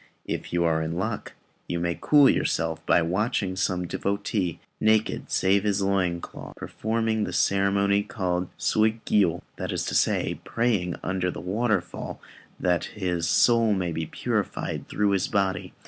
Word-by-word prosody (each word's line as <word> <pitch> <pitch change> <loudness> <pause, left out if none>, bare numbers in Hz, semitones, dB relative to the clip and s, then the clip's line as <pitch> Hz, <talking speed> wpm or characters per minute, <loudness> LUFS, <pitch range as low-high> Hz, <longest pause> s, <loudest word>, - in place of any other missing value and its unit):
If - - -4
you 85 0 +1
are 80 -1 +2
in 80 +1 -2
luck, 100 +5 -3 0.3
you 85 - -2
may 85 0 -1
cool 145 -2 +6
yourself 80 -7 0
by 85 - +4
watching 95 +2 0
some 95 -1 0
devotee, 100 -1 -2 0.2
naked 110 0 +1
save 95 +1 +2
his 105 -2 +1
loin 95 -3 +1
cloth, - - -9
performing 110 0 -1
the - - -3
ceremony 100 +1 +2
called 90 -3 -2
Suigiyô; 110 -5 +2
that - - -3
is - - -2
to - - -3
say, - - +1
praying 105 -7 0
under 95 -1 -1
the - - -5
waterfall 100 -1 -2 0.4
that 90 -3 +1
his 90 -5 -2
soul 115 +1 +4
may 90 -3 -1
be 80 0 -3
purified - - -2
through 105 -1 +1
his 100 -1 +1
body. 95 -2 -1
95 Hz, 150 wpm, -26 LUFS, 90-105 Hz, 0.4 s, cool